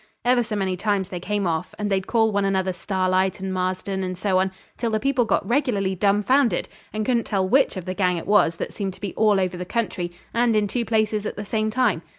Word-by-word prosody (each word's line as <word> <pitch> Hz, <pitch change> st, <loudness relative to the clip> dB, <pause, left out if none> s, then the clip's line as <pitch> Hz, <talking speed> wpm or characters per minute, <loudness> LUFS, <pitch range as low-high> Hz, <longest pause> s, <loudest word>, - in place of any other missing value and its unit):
Ever 245 Hz, 0 st, +4 dB
so 220 Hz, -2 st, -3 dB
many 190 Hz, -2 st, 0 dB
times 195 Hz, -1 st, -1 dB
they 180 Hz, -, -5 dB
came 205 Hz, +2 st, -1 dB
off, 165 Hz, 0 st, -2 dB
and 210 Hz, -, -2 dB
they'd 190 Hz, -1 st, 0 dB
call 225 Hz, -2 st, +3 dB
one 200 Hz, -1 st, +1 dB
another 190 Hz, -1 st, +1 dB
Starlight 185 Hz, 0 st, 0 dB
and 190 Hz, 0 st, -3 dB
Marston, 185 Hz, +1 st, -2 dB
and 185 Hz, -1 st, -4 dB
so 185 Hz, 0 st, +1 dB
on, 190 Hz, 0 st, +1 dB, 0.2 s
till 235 Hz, -, -2 dB
the 215 Hz, -1 st, 0 dB
people 260 Hz, -1 st, +1 dB
got 220 Hz, -, 0 dB
regularly 230 Hz, -8 st, +1 dB
dumbfoundered, 210 Hz, +3 st, +2 dB, 0.2 s
and 215 Hz, 0 st, -2 dB
couldn't 235 Hz, -2 st, +1 dB
tell 190 Hz, -2 st, 0 dB
which 265 Hz, 0 st, +3 dB
of 185 Hz, -, -5 dB
the 185 Hz, -, -3 dB
gang 180 Hz, -2 st, +1 dB
it 165 Hz, -, -5 dB
was 195 Hz, -5 st, +4 dB
that -, -, -5 dB
seemed 195 Hz, -3 st, -4 dB
to -, -, -18 dB
be 200 Hz, -3 st, -4 dB
all 210 Hz, -2 st, +3 dB
over 185 Hz, -1 st, -1 dB
the 180 Hz, -, -4 dB
country, 180 Hz, -4 st, -2 dB, 0.2 s
and 235 Hz, -1 st, +2 dB
in 210 Hz, -1 st, +2 dB
two 235 Hz, +4 st, -2 dB
places 215 Hz, -2 st, 0 dB
at -, -, -5 dB
the 210 Hz, -, -6 dB
same 215 Hz, +1 st, 0 dB
time. 220 Hz, -7 st, +1 dB
200 Hz, 240 wpm, -23 LUFS, 185-220 Hz, 0.2 s, Ever